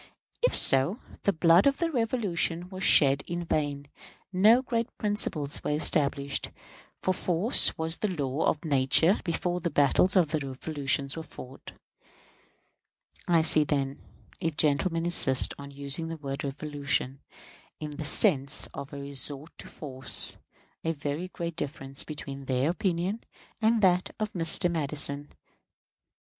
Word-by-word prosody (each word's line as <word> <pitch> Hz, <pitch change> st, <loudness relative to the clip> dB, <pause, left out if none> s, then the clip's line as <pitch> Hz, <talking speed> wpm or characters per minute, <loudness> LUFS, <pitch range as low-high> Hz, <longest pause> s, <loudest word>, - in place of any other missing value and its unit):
If -, -, +1 dB
so, 135 Hz, -, +5 dB, 0.3 s
the 200 Hz, -, +3 dB
blood 170 Hz, -, +4 dB
of 275 Hz, -, +1 dB
the 335 Hz, -1 st, -2 dB
Revolution 200 Hz, -, -2 dB
was 190 Hz, 0 st, -7 dB
shed 140 Hz, -4 st, +4 dB
in 175 Hz, 0 st, -4 dB
vain; 145 Hz, -3 st, -2 dB, 0.5 s
no 220 Hz, +7 st, +4 dB
great 235 Hz, -1 st, -2 dB
principles 170 Hz, -9 st, -2 dB
were -, -, -3 dB
established; 140 Hz, -2 st, 0 dB, 0.5 s
for 185 Hz, -, +1 dB
force 185 Hz, +6 st, +3 dB
was 160 Hz, 0 st, -1 dB
the 215 Hz, -, -2 dB
law 145 Hz, -5 st, -3 dB
of 150 Hz, -, -2 dB
nature 145 Hz, +6 st, +3 dB
before 175 Hz, +1 st, -2 dB
the 170 Hz, -, -3 dB
battles 145 Hz, +6 st, +2 dB
of 175 Hz, -5 st, +3 dB
the 155 Hz, 0 st, -1 dB
Revolution 140 Hz, 0 st, -3 dB
were 165 Hz, -, -6 dB
fought. 135 Hz, -4 st, -12 dB, 1.5 s
I 170 Hz, -2 st, +3 dB
see, 155 Hz, -1 st, +5 dB
then 140 Hz, -2 st, -3 dB, 0.4 s
if 160 Hz, -2 st, -3 dB
gentlemen 165 Hz, +3 st, 0 dB
insist 135 Hz, -6 st, +4 dB
on 140 Hz, 0 st, -9 dB
using 140 Hz, +3 st, -4 dB
the 165 Hz, 0 st, -6 dB
word 140 Hz, -2 st, -6 dB
"revolution" 140 Hz, -1 st, -3 dB, 0.6 s
in 150 Hz, -1 st, -6 dB
the 155 Hz, -, -5 dB
sense 145 Hz, -4 st, +2 dB
of 140 Hz, -, -8 dB
a 140 Hz, -, -8 dB
resort 140 Hz, +2 st, -3 dB
to -, -, -10 dB
force 130 Hz, -4 st, +4 dB, 0.5 s
a 165 Hz, -, -1 dB
very 150 Hz, +3 st, -5 dB
great 170 Hz, -2 st, -6 dB
difference 135 Hz, -3 st, -2 dB
between 140 Hz, -2 st, -8 dB
their 130 Hz, +4 st, 0 dB
opinion 185 Hz, +4 st, -2 dB, 0.4 s
and 220 Hz, 0 st, +2 dB
that 180 Hz, -1 st, +1 dB
of 215 Hz, -1 st, -3 dB
Mr. 170 Hz, +1 st, +3 dB
Madison. 145 Hz, -2 st, +1 dB
Mr. -, -, -25 dB
155 Hz, 145 wpm, -27 LUFS, 140-180 Hz, 1.5 s, so